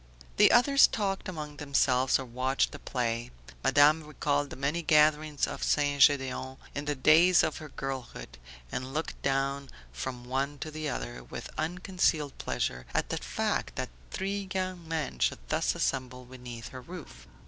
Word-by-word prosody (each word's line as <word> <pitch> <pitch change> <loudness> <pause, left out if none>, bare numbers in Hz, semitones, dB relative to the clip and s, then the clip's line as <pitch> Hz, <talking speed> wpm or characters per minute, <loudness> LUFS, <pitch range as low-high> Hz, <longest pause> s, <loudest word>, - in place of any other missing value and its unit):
The - - +7
others 275 +4 +6
talked 195 -3 -2
among 150 -4 -6
themselves 135 -3 +2
or 135 - -6
watched 130 +2 0
the 145 - -9
play. 120 -2 -2 0.3
Madame 145 +3 +5
recalled 145 -1 -1
the - - -7
many 140 +5 -1
gatherings 150 -1 +3
at - - -6
St. 145 -1 +1
Gedeon 130 -1 +3 0.2
in 145 0 -4
the 145 0 -1
days 165 +6 +6
of 155 - -1
her 155 - -9
girlhood, 130 - -6 0.3
and 130 +2 -4
looked 160 - -4 0.7
from 120 - -5
one 135 +3 -2
to 155 - -6
the 155 -1 -3
other, 120 -3 -5
with - - -8
unconcealed 165 -3 0
pleasure 60 0 -2
at - - 0
the - - -1
fact - - -2
that - - -3 0.2
three 195 0 -3
young 185 -3 -3
men 160 -3 -3
should - - +2
thus - - +1
assemble 125 -1 -2
beneath 125 -2 -9
her 130 - -9
roof. 175 +5 -11
145 Hz, 160 wpm, -29 LUFS, 130-160 Hz, 0.7 s, The